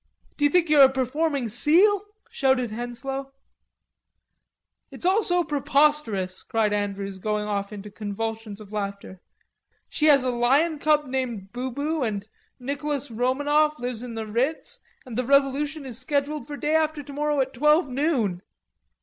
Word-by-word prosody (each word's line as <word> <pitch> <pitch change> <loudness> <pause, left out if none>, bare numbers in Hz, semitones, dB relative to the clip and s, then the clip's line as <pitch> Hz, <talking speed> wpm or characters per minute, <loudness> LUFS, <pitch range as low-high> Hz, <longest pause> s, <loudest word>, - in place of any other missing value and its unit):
"Do 290 - +1
you - - +5
think 345 +2 +3
you're 300 -2 +6
a 270 - +9
performing 270 +1 -1
seal?" 375 - +4 0.3
shouted 265 -4 +1
Henslowe. 255 +4 -5 1.6
"It's - - -8
all 385 +4 +4
so 355 -3 +1
preposterous," 280 - +1
cried 220 -2 0
Andrews, 200 -1 -3
going 210 +1 -1
off 200 -1 -3
into 210 0 -8
convulsions 220 +1 -5
of 210 -1 -12
laughter. 200 -2 -5 0.7
"She 305 - +1
has 280 -3 +6
a 255 - 0
lion 275 +7 +2
cub 300 0 +2
named 245 -7 -4
Bubu 280 +5 -3
and 205 -4 -2 0.3
Nicolas 280 +1 -3
Romanoff 290 +6 +1
lives 245 -2 -4
in 245 -2 -7
the 225 -1 -4
Ritz, 275 - -2 0.3
and 245 -2 -5
the - - +1
Revolution 280 +3 +1
is 245 -3 -2
scheduled 290 0 -2
for 295 -1 -6
day 300 +2 0
after 310 -2 0
tomorrow 290 +1 -2
at 265 0 0
twelve 300 +5 +3
noon." 250 - 0
265 Hz, 150 wpm, -25 LUFS, 225-300 Hz, 1.6 s, a